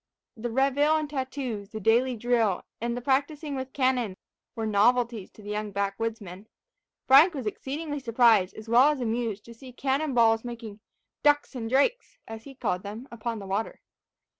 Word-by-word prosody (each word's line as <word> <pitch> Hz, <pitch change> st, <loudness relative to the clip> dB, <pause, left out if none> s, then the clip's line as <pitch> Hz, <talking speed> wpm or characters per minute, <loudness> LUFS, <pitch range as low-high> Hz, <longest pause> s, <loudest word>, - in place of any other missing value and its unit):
The 240 Hz, +1 st, -4 dB
reveille 275 Hz, +5 st, +2 dB
and 305 Hz, -1 st, -2 dB
tattoo, 260 Hz, -7 st, -4 dB
the 220 Hz, -, -7 dB
daily 235 Hz, +5 st, +2 dB
drill, 230 Hz, -4 st, +1 dB, 0.2 s
and 235 Hz, +1 st, -2 dB
the -, -, -4 dB
practising 285 Hz, +2 st, 0 dB
with 260 Hz, 0 st, -5 dB
cannon, 255 Hz, -8 st, 0 dB, 0.4 s
were 225 Hz, -, -3 dB
novelties 225 Hz, 0 st, +2 dB
to 215 Hz, -, -15 dB
the 205 Hz, -, -6 dB
young 210 Hz, 0 st, -3 dB
back 200 Hz, 0 st, -2 dB
woodsmen. 215 Hz, -3 st, -5 dB, 0.6 s
Frank 300 Hz, +6 st, +7 dB
was 265 Hz, -4 st, -4 dB
exceedingly 290 Hz, +7 st, -4 dB
surprised, 230 Hz, -6 st, +3 dB
as 215 Hz, +1 st, -10 dB
well 245 Hz, +5 st, +6 dB
as 300 Hz, -2 st, -1 dB
amused, 225 Hz, -3 st, -2 dB
to 235 Hz, -, -11 dB
see 255 Hz, +3 st, -12 dB
cannon 270 Hz, +2 st, -1 dB
balls 225 Hz, -1 st, +4 dB
making 230 Hz, -4 st, -8 dB, 0.4 s
"ducks 290 Hz, 0 st, +3 dB
and 230 Hz, -3 st, -5 dB
drakes," 455 Hz, -, +1 dB
as 225 Hz, 0 st, -9 dB
he 275 Hz, -1 st, -11 dB
called 200 Hz, -8 st, -2 dB
them, 215 Hz, +6 st, -8 dB
upon 235 Hz, 0 st, -4 dB
the 200 Hz, -, -8 dB
water. 200 Hz, +3 st, -3 dB
235 Hz, 175 wpm, -27 LUFS, 220-270 Hz, 0.6 s, Frank